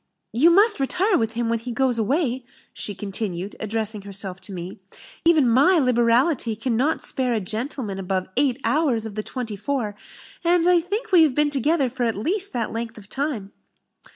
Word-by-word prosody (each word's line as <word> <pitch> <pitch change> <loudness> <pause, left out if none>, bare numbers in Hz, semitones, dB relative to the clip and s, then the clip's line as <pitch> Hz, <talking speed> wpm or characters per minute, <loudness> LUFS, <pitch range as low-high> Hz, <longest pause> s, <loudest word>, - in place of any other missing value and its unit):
You 275 +9 +5
must 410 +4 +4
retire 365 +9 +2
with 225 -4 0
him 235 0 -1
when 230 0 0
he 245 +2 -6
goes 245 -1 +1
away," 260 - 0 0.3
she 205 - -4
continued, 195 -1 -5
addressing 220 -1 -2
herself 195 -1 -4
to 195 - -8
me; 180 0 -7 0.5
"even 320 -6 +5
my 275 +11 +5
liberality 240 -1 +2
cannot 250 +7 0
spare 250 -2 0
a - - +1
gentleman 215 0 -4
above 185 0 -2
eight 265 -1 +1
hours 275 -8 +1
out - - -4
of - - -11
the 215 - -3
twenty 230 -1 -5
four; 215 0 -2 0.5
and 345 0 +3
I 360 -1 +5
think 400 +8 -4
we 360 -3 +7
have 300 -5 +3
been 295 0 +2
together 285 +1 +1
for 250 0 -2
at 230 - 0
least 370 - -1
that 235 -3 -2
length 230 0 -5
of 205 -2 -13
time." 265 -8 -3
240 Hz, 185 wpm, -23 LUFS, 215-295 Hz, 0.5 s, we